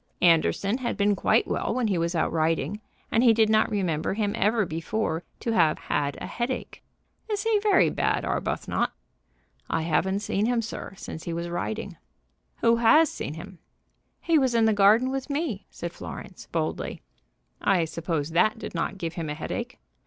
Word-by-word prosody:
Anderson 180 +6 +3
had 245 - -2
been 205 0 +3
quite - - +2
well - - -1
when 250 -2 +1
he 195 -4 +1
was 170 +1 -1
out 160 - +1
riding, 165 +6 0 0.3
and 225 - +3
he 230 -3 +6
did 220 -1 +4
not 215 0 +4
remember 180 -4 -1
him 205 -1 0
ever 215 +1 +2
before 165 +1 -2 0.2
to 230 - -2
have 160 -9 +3
had 140 -1 -2
a - - -5
headache. 245 +2 -4 0.5
"Is 415 -1 -1
he 450 -2 +3
very 415 -1 +4
bad, - - 0
Arbuthnot?" - - -1 0.8
"I 160 - 0
haven't 190 +5 +1
seen 210 +1 0
him, 240 -1 +1
sir, 215 -3 -7
since 160 - -8
he 170 - -3
was 170 +1 -3
riding." 200 +1 -4 0.6
"Who 230 0 +4
has 300 +7 +5
seen 150 - -5
him?" 180 +2 -10 0.6
"He 330 -2 +3
was 260 -3 +1
in 230 -1 +4
the 220 - +4
garden 210 +6 +5
with 270 +1 -3
me," 280 - -2
said 170 0 -6
Florence, 185 - -9
boldly. 160 -2 -3 0.6
"I 180 -4 +3
suppose 165 -1 -3
that 215 +7 +3
did - - -7
not 175 +3 -2
give 170 -3 -4
him 165 -3 -4
a 150 - -3
headache." 240 +10 -5
200 Hz, 180 wpm, -26 LUFS, 165-230 Hz, 0.8 s, he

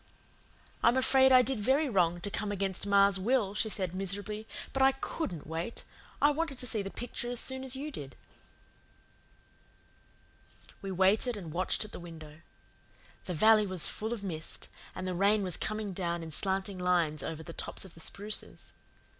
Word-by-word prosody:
"I'm 240 +2 +4
afraid 265 0 +5
I 255 -1 +8
did 260 -2 0
very 270 +8 +3
wrong 175 -7 +2
to 200 - -4
come 210 0 -2
against 195 -1 -2
ma's 200 -1 +5
will," 215 -1 +1
she 220 +1 0
said 185 -4 -3
miserably, 205 +3 -2 0.3
"but 270 - 0
I 270 0 +6
COULDN'T 265 - -4
wait. 165 +8 -4 0.4
I 290 - +5
wanted 300 -2 -2
to 250 - -6
see 225 -3 0
the 195 - -4
picture 240 +2 -5
as 245 -1 -2
soon 260 0 -1
as 265 0 -1
you 290 +3 -4
did." 135 - -8 2.7
We 195 - -5
waited 200 +6 +3
and 170 -6 -7
watched 185 +4 0
at 210 - -11
the - - -7
window. 160 -2 -11 0.8
The 180 - -3
valley 215 +4 +5
was 185 -3 +2
full 220 +2 -3
of 230 -4 -4
mist, 160 -5 -5 0.3
and 185 0 -4
the 185 - -1
rain 200 +3 +3
was 180 -3 -2
coming 215 -2 -3
down 170 -2 -2
in 160 - -7
slanting 190 +3 0
lines 170 -5 +2
over 160 +2 -5
the 165 0 -8
tops - - -2
of 190 - -11
the - - -14
spruces. 205 +5 -3
200 Hz, 180 wpm, -31 LUFS, 180-235 Hz, 2.7 s, I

